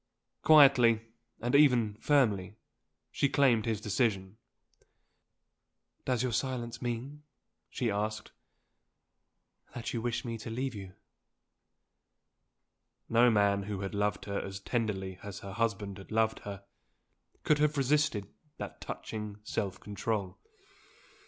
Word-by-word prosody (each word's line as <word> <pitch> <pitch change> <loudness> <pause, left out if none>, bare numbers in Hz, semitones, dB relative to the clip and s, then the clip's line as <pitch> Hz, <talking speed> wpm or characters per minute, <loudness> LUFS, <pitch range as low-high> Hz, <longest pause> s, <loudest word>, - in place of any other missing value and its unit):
Quietly, 125 -7 +7 0.4
and 120 +1 -1
even 125 -7 +5
firmly, 105 -9 +2 0.6
she 140 - +1
claimed 120 -6 +3
his 110 -3 0
decision. 105 -2 -1 1.7
"Does 125 -2 +1
your 125 - 0
silence 120 0 -2
mean," 125 +5 -4 0.5
she 120 -4 -1
asked, 105 +1 -3 1.4
"that 120 - -4
you 115 - -2
wish 120 +3 -2
me 115 -1 -4
to 110 - -7
leave 130 +3 -2
you?" 95 -3 -9 2.1
No 120 +2 +5
man 100 -2 +3
who 100 -1 -4
had 95 +1 -4
loved 105 0 -1
her 100 -1 -2
as 95 0 -6
tenderly 95 -5 -2
as 100 -1 -8
her 100 -1 -7
husband 105 -3 -2
had 95 - -12
loved 110 0 +1
her, 100 -1 -8 0.8
could 150 -1 +3
have 150 0 +2
resisted 140 -6 +2 0.3
that - - -7
touching 105 -2 -6
self 100 -2 -3
control. 105 -1 -3
110 Hz, 120 wpm, -31 LUFS, 100-125 Hz, 2.1 s, Quietly